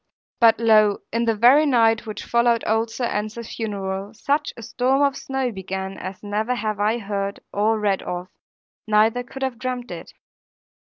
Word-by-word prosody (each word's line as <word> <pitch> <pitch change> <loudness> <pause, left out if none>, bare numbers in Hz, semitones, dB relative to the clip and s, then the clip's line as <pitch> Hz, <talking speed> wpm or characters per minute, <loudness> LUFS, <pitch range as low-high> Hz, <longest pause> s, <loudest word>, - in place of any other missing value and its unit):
But 225 -1 +5
lo, 215 -3 +4
in 230 +1 +1
the 225 -1 +2
very 260 +8 +6
night 225 -3 +3
which 215 - -6
followed 235 -1 +2
old 225 +1 +1
Sir 240 +2 -3
Ensor's 215 +1 -4
funeral, 200 -1 -4
such 290 +5 0
a 230 - -9
storm 260 +4 +1
of 280 -1 +2
snow 265 -2 -2
began 190 -1 -5
as 185 +2 -7
never 215 +4 -1
have 215 -3 -3
I 215 +3 +2
heard 200 -2 -3
nor 215 +2 +1
read 200 -2 +1
of, 180 0 -5 0.6
neither 220 +3 +3
could 265 +2 -8
have 255 -3 -3
dreamed 250 -1 -4
it. - - -8
225 Hz, 170 wpm, -22 LUFS, 205-245 Hz, 0.6 s, very